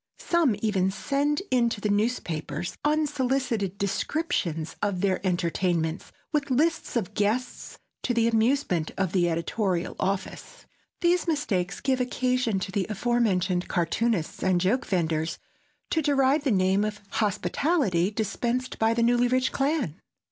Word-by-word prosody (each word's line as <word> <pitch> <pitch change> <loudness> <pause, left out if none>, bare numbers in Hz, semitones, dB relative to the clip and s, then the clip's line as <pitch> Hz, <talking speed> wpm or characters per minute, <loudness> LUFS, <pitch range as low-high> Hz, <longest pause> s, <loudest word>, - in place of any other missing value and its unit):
Some 335 - +2
even 195 -4 +2
send 285 - 0
in 240 -2 +3
to 230 - -4
the 210 - -1
newspapers 175 - -1
unsolicited 265 - 0
descriptions 195 - -1
of 200 -3 -1
their 190 -2 +1
entertainments 175 -2 -1 0.2
with 295 -3 0
lists 310 +5 +1
of 210 -4 -1
guests, 215 +5 -2 0.2
to - - -1
the 230 -1 +2
amusement 225 - +1
of 190 -3 0
the 175 -2 +2
editorial 170 +2 -1
office. 190 0 -3 0.4
These 350 0 +2
mistakes 205 - -1
give 260 -2 +1
occasion 250 -3 0
to 190 - -4
the 195 -2 -1
aforementioned 200 -5 +1
cartoonists 180 +1 0
and 185 -2 +2
joke 200 +9 +1
venders 160 -3 0 0.5
to 320 - +2
deride 280 0 +2
the 270 - +3
name 190 0 +3
of 210 -1 -3
hospitality 205 - +1
dispensed 235 +4 -2
by 225 +1 +3
the 235 - +2
Newlyrich 245 +2 +2
clan. 270 - -1
215 Hz, 135 wpm, -26 LUFS, 185-255 Hz, 0.5 s, in